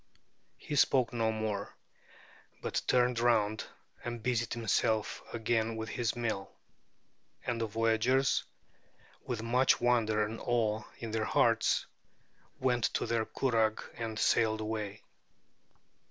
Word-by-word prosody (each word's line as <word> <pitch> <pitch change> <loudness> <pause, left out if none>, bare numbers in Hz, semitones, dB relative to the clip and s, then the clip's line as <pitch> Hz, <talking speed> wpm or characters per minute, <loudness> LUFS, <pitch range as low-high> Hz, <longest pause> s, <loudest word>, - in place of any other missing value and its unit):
He 150 - -5
spoke 130 -3 +3
no 115 -2 +1
more, 110 -2 -3 0.9
but - - -1
turned 125 -1 +3
round 110 -3 +2 0.4
and 120 -1 -5
busied 120 -2 0
himself 110 -1 0
again 115 -1 0
with 110 0 -4
his 120 0 -1
mill. 110 -5 -2 1.0
And 120 -2 -1
the 115 - 0
voyagers, 115 +5 +2 0.8
with 120 -4 -3
much 125 +3 +3
wonder 110 -3 +2
and 110 +1 -6
awe 110 -3 0
in 115 -2 -6
their 110 -1 0
hearts, - - +2 0.7
went 125 -2 +2
to - - 0
their 115 -1 0
curragh 115 -4 +1
and 115 -2 -4
sailed 110 0 +2
away. 110 -1 -4
115 Hz, 120 wpm, -32 LUFS, 110-120 Hz, 1.0 s, spoke